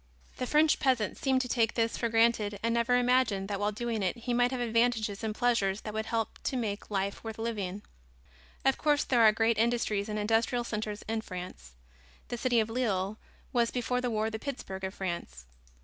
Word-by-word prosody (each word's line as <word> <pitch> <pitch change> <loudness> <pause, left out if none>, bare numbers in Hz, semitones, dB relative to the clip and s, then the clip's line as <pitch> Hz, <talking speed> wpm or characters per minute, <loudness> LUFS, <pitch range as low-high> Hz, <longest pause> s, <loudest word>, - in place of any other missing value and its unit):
The 255 - -2
French 305 +2 +4
peasant 250 -7 +1
seemed 265 -1 +1
to 250 - -3
take 230 -3 +1
this 230 -1 +1
for 235 - -1
granted 225 -3 +2
and 230 0 +1
never 235 +1 +3
imagined 245 -6 +2
that 200 -1 -2
while 205 +1 +1
doing 225 0 -2
it 190 +5 0
he 240 +1 -3
might 245 0 +3
have 260 -1 -3
advantages 230 -3 +1
and 215 -1 -2
pleasures 215 -5 +1
that 215 - -6
would 220 +1 -3
help 225 -1 -2
to 265 - 0
make 210 -4 -3
life 200 -1 -2
worth 225 -1 -6
living. 205 -4 -3 0.8
Of 270 - +3
course, 295 -1 +3
there 245 -3 +2
are 220 -1 +8
great 225 +1 +1
industries 225 -3 +1
and 210 - -2
industrial 225 +3 +1
centers 215 -2 -4
in 220 0 -2
France. 180 - -8 0.6
The 240 - -3
city 245 -1 +2
of 220 - +1
Lille 215 -4 -1 0.3
was, 235 -2 +3
before 250 0 -1
the 250 - -1
war, 220 0 0
the 220 - -4
Pittsburg 215 -8 -6
of 190 +1 -4
France. 170 - -5
225 Hz, 200 wpm, -30 LUFS, 205-245 Hz, 0.8 s, are